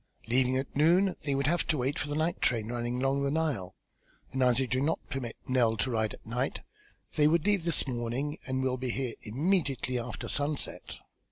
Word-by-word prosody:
Leaving 130 +2 +3
at 135 - -4
noon 175 +6 +4
they 140 -1 0
would 140 0 0
have 170 +4 +2
to 155 - +1
wait 135 +3 -1
for - - -1
the 145 - -2
night 160 +3 0
train 115 -2 +1
running 120 0 -2
along 135 +2 +1
the 140 - +1
Nile, 145 - -1 0.6
and 130 - -2
as 125 -1 +4
I 135 - +2
do 130 +1 0
not 160 +4 +2
permit 125 -4 -4
Nell 120 -4 +3
to 130 +5 0
ride 110 -2 0
at - - -22
night, 125 +4 -2 0.6
they 150 -1 +6
would 165 +1 +2
leave 200 -5 +2
this 165 -4 +1
morning 125 +4 -2
and 130 0 -1
will 130 -1 0
be 130 0 -3
here 125 -1 -2
immediately 135 - 0
after 120 +1 -5
sunset." 145 0 -1
130 Hz, 205 wpm, -30 LUFS, 125-150 Hz, 0.6 s, they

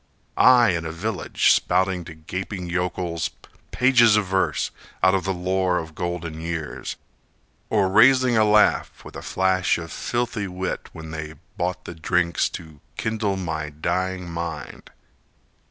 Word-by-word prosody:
I 125 -2 +6
in 85 -2 -1
a 80 - -4
village, 90 +3 +1
Spouting 90 -1 +1
to 80 - -10
gaping 90 +4 -5
yokels 90 -1 -2 0.4
pages 120 -4 +5
of 105 - +1
verse, 95 0 0 0.3
Out 95 - +5
of 95 -1 0
the 95 - 0
lore 90 0 0
of 80 -2 -5
golden 85 -2 -4
years, 80 -2 -4 0.7
Or 105 -3 +2
raising 125 +5 +5
a 110 - +5
laugh 105 0 +3
with - - -11
a - - -6
flash 95 -1 +1
of 85 -1 -7
filthy 120 -4 -2
wit 95 0 -4
When 80 -1 -9
they 80 0 -6 0.2
bought 90 +1 -3
the - - -6
drinks 85 0 +1
to 80 -3 -14 0.2
kindle 110 -3 -1
my 80 -4 -3
dying 90 +4 -2
mind. 85 -2 -6
90 Hz, 145 wpm, -23 LUFS, 85-95 Hz, 0.7 s, I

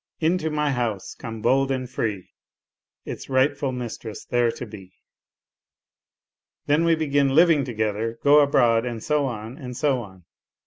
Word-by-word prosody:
' - - -64
Into 165 0 +1
my 150 -1 0
house 120 -6 -2
come 115 -3 -8
bold 135 0 +3
and 130 -1 -2
free, 105 -6 -4 0.7
Its - - -7
rightful 135 +1 +1
mistress 120 -3 -6
there 120 -1 +2
to 125 - -7
be.' 95 -4 -12 0.9
" - - -69
Then 150 +3 +2
we 165 -1 +4
begin 140 -3 +1
living 165 -3 +5
together, 110 -2 -2
go 145 +1 +7
abroad 120 -5 +3
and 120 -3 -5
so 150 -2 +1
on, 115 +1 -6
and 125 -2 -7
so 140 -3 +1
on. 95 -5 -13
130 Hz, 155 wpm, -24 LUFS, 115-145 Hz, 0.9 s, go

